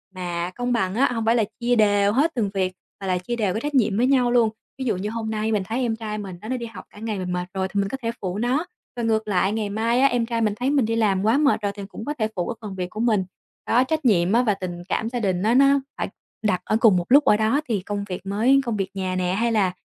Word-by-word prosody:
mà 175 -1 -3
công 245 0 -1
bằng 190 -5 0
á 260 +2 +3
hông 225 -2 -2
phải 230 +1 +4
là 230 - +3 0.2
chia 245 0 +2
đều 205 -2 +3
hết 295 +7 +3
từng 220 -5 0
việc 185 -2 0 0.3
mà 195 - -4
là 185 -1 +1
chia 185 +7 -4
đều 210 -6 0
cái 220 - -2
trách 295 +1 -3
nhiệm 215 -6 +3
với 245 +3 +3
nhau 255 -3 +3
luôn. 235 -2 +4 0.3
Ví 265 - -4
dụ 220 -6 0
như 200 +3 -3
hôm 225 0 -4
nay 220 0 -1
mình 210 -3 +1
thấy 230 +6 -2
em 235 -3 0
trai 215 -1 -5
mình 195 -3 -6
nó 215 - -8
nó 255 - -1
đi 235 - -5
học 230 - -10
cả - - -15
ngày 215 -2 -3
mình 180 -1 -3
mệt 180 0 -2
rồi 190 -1 -1
thì 200 - -2
mình 195 0 0
có 270 - -4
thể 230 -1 -1
phụ 185 0 -3
nó, 250 +9 0 0.3
và 240 - -3
ngược 220 -1 +1
lại 190 -1 +2
ngày 215 -2 -2
mai 225 +4 +1
á 275 - +6
em 245 -3 0
trai 230 0 -2
mình 215 -2 +2
thấy 250 +3 0
mình 280 -4 +2
đi 225 +1 -1
làm 200 -4 +2
quá 225 +5 +4
mệt 285 -6 +3
rồi 205 -1 -1
thì 200 - -7
cũng 220 - -8
có 295 - -2
thể 215 - +2
phụ 175 - -2
cái 235 - -3
phần 205 -3 -6
việc 180 -1 -3
của 215 - -8
mình. 220 -5 +2 0.4
Đó, 245 +2 +4
trách 310 +2 -2
nhiệm 190 -4 +3
á 240 +2 +4
và 215 -4 +2
tình 175 -2 -6
cảm 225 - -1
gia 245 0 -3
đình 190 -4 0
á 220 +2 +3
nó 275 +1 +5 0.2
phải - - -2 0.3
đặt 205 -4 +1
ở 215 - +2
cùng 210 -5 +6
một 175 - -1
lúc 285 +2 +7
ở 210 - +5
đó 220 +7 +2
thì 210 -5 0
công 205 +1 -4
việc 180 0 -5
mới 230 +8 +3
công 230 -3 -1
việc 195 -2 -2
nhà 185 -1 -2
nè 180 0 0
hay 230 +4 +1
là 200 -5 +2
220 Hz, 310 wpm, -23 LUFS, 195-240 Hz, 0.4 s, lúc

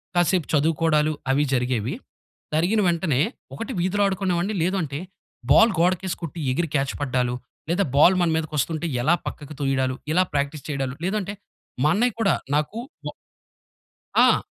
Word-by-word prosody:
కాసేపు 175 -1 +2
చదువుకోడాలు 155 0 +2 0.2
అవి 145 +2 +3
జరిగేవి. 125 -3 0 0.6
జరిగిన 175 +8 +2
వెంటనే 165 -6 +1 0.3
ఒకటి 230 +4 -5
వీధిలో 190 +4 +1
ఆడుకునేవాడిని, 190 0 -1
లేదూ 185 +3 +1
అంటే 140 0 -4 0.5
బాల్ 225 +8 +7
గోడకేసి 185 +1 +1
కొట్టి 165 +1 -6
ఎగిరి 165 +4 -1
క్యాచ్ 135 -1 +1
పడ్డాలు, 125 -3 0 0.3
లేదా 190 +4 +2
బాల్ 170 +6 +6
మన 175 - +3
మీదకొస్తుంటే 155 +1 -1 0.2
ఎలా 155 +7 +3
పక్కకు 150 0 -7
తొయడాలు, 130 -2 0 0.2
ఇలా 185 +3 +4
ప్రాక్టీస్ 140 0 -1
చేయడాలు, 135 -2 -2
లేదంటే 200 +1 -1 0.5
మా 150 - +4
అన్నయ్య 245 +2 +2
కూడా 205 -3 +3 0.2
నాకు 150 +8 -1 0.3
బా - - -3 1.0
ఆ! - - +5
160 Hz, 140 wpm, -24 LUFS, 140-185 Hz, 1.0 s, బాల్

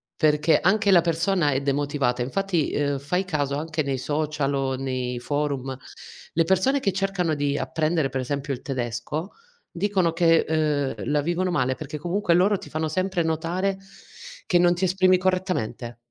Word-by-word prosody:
Perché 155 0 +3
anche 200 +2 +3
la 175 - +7
persona 170 -1 +1
è 135 0 0
demotivata 140 -3 0
infatti, 170 +4 -1
uhm, 145 -1 0
fai 180 +7 -1
caso 145 -5 -1
anche 155 +1 -2
nei 135 -1 -2
social 150 +1 -1
o 135 -1 0
nei 130 -2 -3
forum, 140 -1 -2 0.6
le 165 - +3
persone 190 - +2
che 200 -7 0
cercano 190 -3 0
di 145 0 0
apprendere, 155 -3 0
per 130 0 -2
esempio 140 +2 -3
il 125 - -7
tedesco, 130 - -4 0.4
dicono 185 -2 0
che 165 -1 +4
ehm, 150 -3 0 0.2
la 150 0 +2
vivono 175 +4 -1
male 130 -6 +1
perché 150 +1 -6
comunque 175 +4 0
loro 195 +3 +3
ti - - -11
fanno 160 +1 -2
sempre 185 +2 -1
notare 170 +5 -1 0.7
che 175 - +3
non 175 0 +5
ti 175 - -4
esprimi 185 0 +4
correttamente. 180 - -2
155 Hz, 165 wpm, -24 LUFS, 140-180 Hz, 0.7 s, la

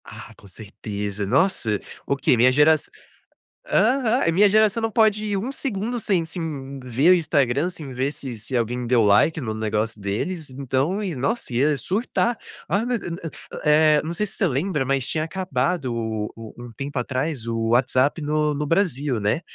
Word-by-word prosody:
Ah, - - -11
com 100 - -17
certeza. 100 +1 -5
Nossa, 120 - +1 0.3
o 140 - +1
quê, 135 - +2
minha 125 +2 +5
geraç 150 +3 +4 0.8
aham, 240 -2 +2
minha 200 +5 +5
geração 215 +2 +3
não 225 - 0
pode 215 -1 +3
ir 205 -1 -1
1 230 +8 -3
segundo 240 -3 -3
sem 195 -5 +1
sem 150 -5 -6
ver 130 +6 +2
o - - +9
Instagram, 145 -2 +1
sem 155 -7 -8
ver 130 +3 -1
se 130 -6 -7
se 120 +5 -5
alguém 120 +1 -2
deu 120 -2 +4
like 105 +11 +4
no 110 -4 -3
negócio 110 0 -2
deles, 140 - -3
então 135 - -1
e 185 -4 -2
nossa, 140 - -2
ía 140 +4 +2
surtar. 225 - -1 0.3
"Ah, 205 +4 0
mas 245 -1 -1
eu 175 - -5
eu" 165 - -5 0.4
Eh, 150 0 +5
não 160 +2 -4
sei 210 +5 -1
se 205 - -5
você 195 - +2
lembra, 150 0 -1
mas 135 -1 0
tinha 155 - -1
acabado 165 -5 -1
o 110 -2 -3
o 115 -1 -10
um 120 0 -9
tempo 140 +4 -6
atrás, 130 +1 -2
o 115 -1 -1
WhatsApp 130 +5 +2
no 150 0 0
no 150 +1 -2
Brasil, 145 - 0
né. 105 +10 0
145 Hz, 185 wpm, -23 LUFS, 120-180 Hz, 0.8 s, o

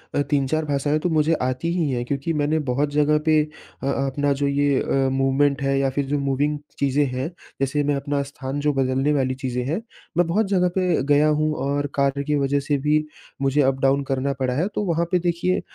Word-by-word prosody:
अ, 145 - +3
3-4 145 +2 0
भाषाएँ 145 +1 0
तो 175 - -1
मुझे 155 0 +2
आती 130 +6 -1
ही 155 -5 +1
हैं, 120 -2 -1
क्योंकि 140 +5 -2
मैंने 150 +1 +1
बहुत 140 +4 +1
जगह 150 +1 +3
पे 155 -1 +4
अ, 150 -3 -12
अपना 140 +1 0
जो 140 - +2
ये 140 -1 +2
अ, 135 -1 +1
मूवमेंट 135 +1 +2
है 135 0 +1
या 135 -1 +2
फिर 140 +1 -2
जो 145 +1 -1
मूविंग 140 +2 0 0.2
चीज़ें 140 +1 +2
हैं, 130 +4 -3 0.3
जैसे 145 +2 +1
मैं 145 0 +1
अपना 140 0 -1
स्थान 140 0 -5
जो 150 0 +1
बदलने 135 +2 +1
वाली 130 -2 0
चीज़ें 125 -2 -3
हैं, 165 +10 -1 0.4
मैं 175 -1 +3
बहुत 200 +4 +1
जगह 180 -2 +2
पे 180 -6 +1
गया 150 +2 +4
हूँ 155 0 +1 0.2
और 145 0 0
कार्य 140 0 +1
की 150 +1 0
वजह 140 0 +1
से 145 0 0
भी 155 0 +3 0.4
मुझे 135 +2 +2
अप-डाउन 135 +1 +2
करना 135 +1 0
पड़ा 130 -1 0
है। 160 +9 0
तो 210 - 0
वहाँ 170 -1 +1
पे, 180 - +3
देखिए 175 +1 0
145 Hz, 215 wpm, -23 LUFS, 135-150 Hz, 0.4 s, पे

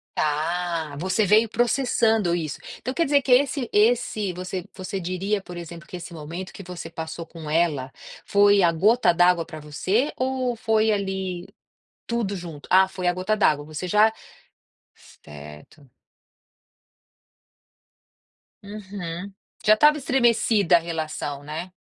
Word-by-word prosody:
Tá. 160 0 -1
Você 190 +4 +1
veio 215 +3 +4
processando 225 -5 +2
isso. 155 -4 -4 0.2
Então 255 - -5
quer 335 +4 +1
dizer, 285 0 +3
que 255 - -1
é 250 - +8
esse 270 -3 -4
esse, 215 -2 +2
você 185 +1 -5
você 190 +1 -5
diria, 185 +4 -2
por 180 -2 -10
exemplo, 170 -1 -9
que 180 - -7
esse 175 0 -9
momento 165 +4 -7
que - - -9
você 180 -2 -8
passou 160 0 -6
com 160 -2 -10
ela, 150 -5 0 0.3
foi 205 0 +4
a 170 -2 +4
gota 195 +4 +3
d'água 175 0 +3
para 155 - -10
você, 185 - -1
ou 255 -1 -1
foi 220 -1 +2
ali 190 -3 -3 0.6
tudo 230 -4 -2
junto 165 -5 -9
ah, 190 +1 +6
foi 185 -1 -5
a 175 - +3
gota 185 +4 -1
d'água, 150 -8 +2
você 155 +4 -6
já 210 +3 +4 0.8
certo. 75 - -14 2.8
Uhum. 200 -2 -7 0.3
Já 215 - +7
estava 300 +7 +5
estremecida 235 - +3
a - - 0
relação, 155 -4 -4
né. 160 +5 -6
185 Hz, 140 wpm, -24 LUFS, 165-215 Hz, 2.8 s, é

